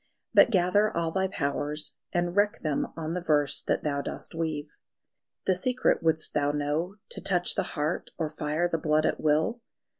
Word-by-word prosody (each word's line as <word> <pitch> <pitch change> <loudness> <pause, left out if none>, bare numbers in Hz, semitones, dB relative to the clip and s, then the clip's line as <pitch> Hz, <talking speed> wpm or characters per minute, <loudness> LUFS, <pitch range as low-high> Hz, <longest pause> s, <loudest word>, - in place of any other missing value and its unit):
But - - +7
gather 205 +1 +3
all 165 -3 -1
thy 190 +2 +1
powers, 150 -3 -2 0.2
and 175 0 0
wreck 205 0 +2
them 150 -3 0
on 160 0 -3
the 180 - -2
verse 150 -4 +2
That - - -1
thou 140 -2 0
dost - - -6
weave.... 155 -2 -3 0.7
The 190 - +4
secret 250 +8 +1
wouldst 160 -1 +2
thou 145 0 +2
know 150 +6 -1
To - - -5
touch 180 -2 +2
the - - 0 0.2
heart 150 +3 -1
or 160 - 0
fire 150 +3 -1
the 165 -2 -1
blood 155 0 +2
at - - 0
will? 155 +10 +2
160 Hz, 180 wpm, -28 LUFS, 150-180 Hz, 0.7 s, But